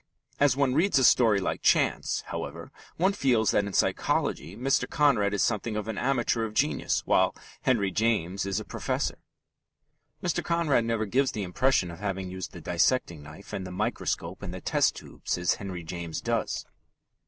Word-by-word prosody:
As 140 -3 +4
one 140 -2 +2
reads 160 +2 +3
a 135 - +3
story 115 -4 +5
like 95 - -2
Chance, - - +2
however, - - -6 0.3
one 190 +4 +2
feels 120 - +2
that 105 - +2
in 100 - -6
psychology 90 +1 0
Mr. 135 +3 +1
Conrad 135 -10 +3
is 100 - +1
something 110 0 -1
of 105 0 -3
an 110 -2 -3
amateur 120 -3 +1
of 110 -1 -5
genius, 145 +2 +1
while - - +3 0.3
Henry 105 -7 +1
James 100 -3 0
is 100 +1 -1
a 110 - -7
professor. - - -2 1.0
Mr. - - 0
Conrad 165 -8 +1
never 115 -1 0
gives 130 +6 +1
the 105 - -3
impression 95 0 +1
of 85 - -10
having 95 -2 -3
used 95 -1 -6
the 85 - -10
dissecting 85 - +1
knife 75 +7 -12
and 95 - -3
the 90 - -7
microscope 90 0 -2
and 95 -3 -5
the 95 - -6
test - - +1
tubes - - -5
as 90 -1 +2
Henry 95 -4 -5
James 85 0 -5
does. - - -2
105 Hz, 175 wpm, -27 LUFS, 95-130 Hz, 1.0 s, story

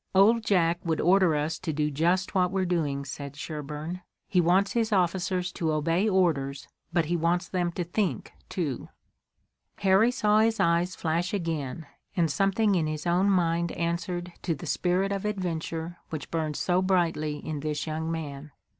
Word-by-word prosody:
"Old 220 +4 +5
Jack 175 -5 +2
would 160 -2 0
order 180 -1 +4
us 155 +2 -1
to 160 - -3
do 150 0 0
just 175 +7 +1
what 180 -2 +3
we're 190 0 0
doing," 150 -6 -1
said 140 0 -7
Sherburne. 155 +3 -5 0.3
"He 180 - +3
wants 185 +4 +3
his 230 -2 0
officers 180 -1 +1
to 160 -2 -1
obey 165 +7 +1
orders, 145 -8 +1 0.2
but 170 -2 +2
he 170 +3 0
wants 170 +2 +1
them 175 -2 -1
to 175 - -2
think, 175 - -2 0.2
too." 150 -9 -3 0.9
Harry 195 +4 +4
saw 215 -4 +3
his 225 0 +2
eyes 175 0 +2
flash 170 +4 -1
again, 165 -5 -3 0.3
and 165 -3 +2
something 195 +5 +2
in 165 -4 +1
his 155 +1 -4
own 180 +3 +3
mind 170 -2 +1
answered 175 +1 -2
to 165 -3 -1
the 140 - -9
spirit 185 +2 +1
of 195 -1 -2
adventure 175 -4 -3
which 155 -2 -6
burned 155 -2 -1
so 180 +4 +1
brightly 170 -5 +1
in 155 0 -5
this 150 -1 -2
young 160 +1 -3
man. 150 -3 -5
170 Hz, 170 wpm, -27 LUFS, 155-185 Hz, 0.9 s, Old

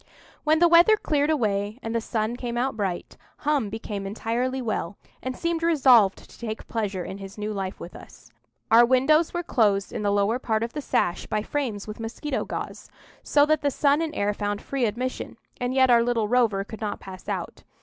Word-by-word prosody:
When 310 0 +3
the 345 +2 +5
weather 345 +6 +6
cleared 295 -6 0
away, 210 -7 0
and 225 - -3
the 230 - 0
sun 220 +1 -2
came 240 -1 -4
out 260 +1 0
bright, 195 -5 -3 0.2
Hum 285 -7 0
became 205 -2 -5
entirely 235 +5 -2
well, 210 -6 -3 0.2
and 255 -1 -4
seemed 335 -1 -1
resolved 260 - +4
to - - -17
take 220 -2 -5
the - - -20
measure 205 -5 -2
of 195 - -7
his 195 +1 -9
new 210 +1 -3
life 195 -2 -4
with 175 - -9
us. 110 - -14 0.4
Our 230 +1 +8
windows 270 +6 +3
were 350 0 -3
closed 205 - +1
in - - -3
the 205 - +1
lower 205 +4 +1
part 220 -3 0
of 235 - -4
the 295 - -4
sash 175 -9 0
by 215 -1 -1
frames 235 -7 -3
with 215 +1 -7
mosquito 235 +6 -3
gauze, - - -6 0.3
so 290 0 +4
that 310 0 +2
the 290 - +2
sun 285 +2 +2
and 320 -2 -3
air 205 +1 0
found 205 0 -2
free 270 +1 -1
admission, 245 +4 -3 0.2
and 245 0 -1
yet 260 -1 +4
our 235 -1 +6
little 235 -2 +1
rover 225 -4 +2
could 220 +2 -10
not 210 -1 -3
pass 185 -1 -10
out. - - -4
230 Hz, 210 wpm, -25 LUFS, 205-270 Hz, 0.4 s, Our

